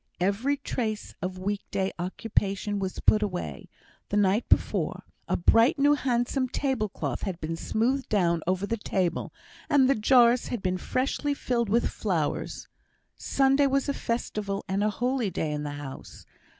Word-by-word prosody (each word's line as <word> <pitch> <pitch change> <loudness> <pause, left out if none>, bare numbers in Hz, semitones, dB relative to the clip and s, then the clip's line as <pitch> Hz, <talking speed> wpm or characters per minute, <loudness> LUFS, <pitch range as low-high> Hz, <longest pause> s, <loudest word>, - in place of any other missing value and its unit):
Every 210 +10 +1
trace 220 -6 -3
of 185 +1 -3
week 200 +2 -2
day 195 -1 -1
occupation 200 +2 -1
was 190 -1 -3
put 215 - +4
away; 190 -4 -4 0.4
the 205 - 0
night 205 +2 +2
before, - - +1 0.2
a - - +1
bright 230 - +4
new 285 +1 +5
handsome 255 -1 0
tablecloth 245 -8 -2
had 185 -4 -4
been 160 +1 -3
smoothed 250 +10 -1
down 170 -5 +2
over 185 +2 +1
the 230 +3 -2
table, 185 -4 -1 0.4
and 275 -3 +5
the 275 - +5
jars 240 +1 +4
had 235 -5 -4
been 185 -1 0
freshly 280 +6 -1
filled 235 -5 -1
with 235 +3 +2
flowers. 170 -8 -2 0.5
Sunday 275 +1 +3
was 275 +1 +1
a 280 - +1
festival 210 -5 -3
and 195 +1 0
a 210 - +3
holy 245 0 0
day 160 -3 -2
in 150 0 -2
the 145 -1 -4
house. 140 -2 -9
210 Hz, 160 wpm, -27 LUFS, 190-255 Hz, 0.5 s, new